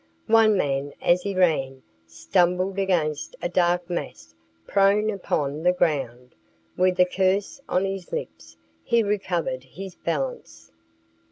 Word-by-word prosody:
One 220 -2 +5
man, 140 -3 -1
as 175 +1 +3
he 200 +1 -4
ran, 135 -8 +1 0.2
stumbled 175 - 0
against 165 -6 -1
a - - -2
dark 175 0 +1
mass 170 - -6 0.3
prone 200 +2 +3
upon 150 -7 -2
the 180 +2 +3
ground. 135 -8 -1 0.4
With 185 0 +1
a 180 - +7
curse 190 +6 0
on 185 +2 +1
his 195 -2 -5
lips, 80 0 -7 0.3
he 235 -1 +2
recovered 185 -10 -2
his 180 +9 -9
balance. 135 - -5
175 Hz, 125 wpm, -24 LUFS, 135-195 Hz, 0.4 s, a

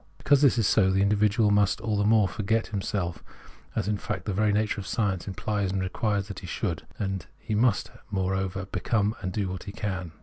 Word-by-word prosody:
Because 145 -1 +3
this 140 -4 +5
is 115 - +2
so, 95 -1 +4
the 95 +1 +3
individual 105 +1 +3
must 100 -1 +3
all 110 -1 -1
the 100 - +2
more 105 -1 +4
forget 110 +2 0
him 100 - 0
self, 90 -4 -3 0.5
as - - -1
in 105 -1 +1
fact - - -4
the 100 - -1
very 105 +2 +2
nature 105 0 0
of 95 - -9
science 100 -5 -1
implies 100 0 -1
and 95 - -1
requires 100 +2 -1
that 100 -2 -6
he 90 - -9
should; 85 -2 -3
and 95 -2 -3
he 110 - -5
must, 110 0 +2 0.2
moreover, 95 0 -1
become 100 +3 0
and 95 - -3
do 100 +1 -1
what 95 0 -5
he 100 - -5
can. 95 -5 -4
100 Hz, 215 wpm, -27 LUFS, 95-105 Hz, 0.5 s, this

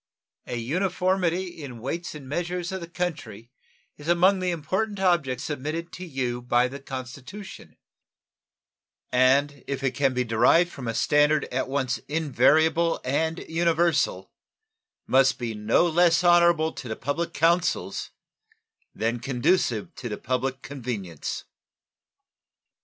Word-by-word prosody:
An 120 - -3
uniformity 180 +6 0 0.2
in 135 -4 -7
the - - -11
weights 170 +5 -4
and 140 -3 -9
measures 175 +4 -3
of 190 -1 -4
the 170 - -8
country 125 - -5 0.5
is 145 - -11
among 180 +3 +4
the 185 0 -1
important 190 +6 -2
objects 160 -9 +1
submitted 155 +4 -4
to 180 - -7
you 130 -7 -3
by 120 0 +2
the 140 +2 -8
Constitution, 135 - -9 1.3
and 135 +3 +3
if 140 -1 -3
it 135 - +2
can 135 -2 +1
be 125 - +1
derived 125 +10 +3
from 130 -4 -7
a 115 - -2
standard 150 +4 +3
at 130 - -1
once 135 -2 -1
invariable 160 +3 +3
and 160 +5 -1
universal, 165 - +1 0.7
must 135 0 +4
be 120 -2 -3
no 105 +9 +2
less 175 +1 +3
honorable 170 -2 +4
to 130 - -8
the 110 - -3
public 165 +7 -2
councils 165 - +1 0.9
than 115 +2 -1
conducive 125 - 0
to 120 - -6
the 105 - -4
public 130 +1 -2
convenience. 115 - -5
145 Hz, 130 wpm, -25 LUFS, 125-170 Hz, 1.3 s, among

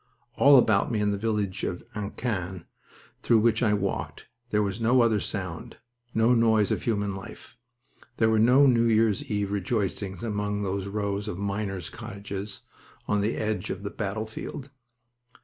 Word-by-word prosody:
All 140 0 +7
about 110 -3 +3
me 110 - 0
in 105 0 +1
the 100 - -1
village 105 -3 -1
of 90 - -3
Annequin, 100 -3 -4 0.6
through 115 - +4
which 110 0 +3
I 105 -4 +3
walked, 100 -1 -3 0.2
there 105 -2 +2
was 100 +2 -3
no 120 +3 +4
other 110 -3 +2
sound, 95 -5 -5 0.3
no 115 +2 +3
noise 110 -3 +3
of - - 0
human 105 -3 -1
life. 95 +3 -10 0.6
There 110 -1 +3
were 110 - +3
no 125 +5 +6
New 120 -3 +4
Year's 110 +1 +3
eve 105 -2 -1
rejoicings 100 -2 -2
among 105 -2 -2
those 95 0 -2
rows 100 0 -2
of 105 - -4
miners' 100 -3 -3
cottages 100 0 -7 0.5
on 105 -1 +1
the 105 +3 -1
edge 105 -2 -2
of 95 +1 -5
the 100 - -4
battlefield. 110 +6 -5
105 Hz, 160 wpm, -27 LUFS, 100-110 Hz, 0.6 s, All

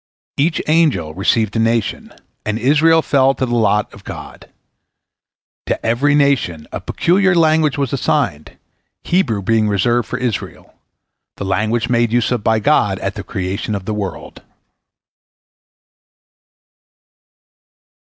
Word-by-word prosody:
Each 155 +3 +1
angel 150 - +1
received 105 +4 0
a - - +1
nation, 115 -2 -1 0.3
and 105 0 -2
Israel 155 +6 +3
fell 135 -1 +2
to 130 - -1
the 120 - -4
lot 105 -2 +1
of - - -14
God. - - -10 1.2
To - - -2
every 135 +6 +2
nation 135 - +1
a - - -5
peculiar 190 +1 +1
language 155 -3 +3
was 140 -3 -2
assigned, 100 - -1 0.5
Hebrew 120 - 0
being 110 0 +2
reserved 115 +4 +1
for 125 - -4
Israel—the 120 -3 -8
language 110 +4 0
made 120 -2 +1
use 120 +1 +1
of 120 -4 -1
by 110 0 +2
God 110 - +2
at - - -3
the - - -6
creation 95 +3 -3
of 95 -2 -6
the 110 - -3
world. 100 -4 -6
120 Hz, 125 wpm, -17 LUFS, 105-140 Hz, 1.2 s, Israel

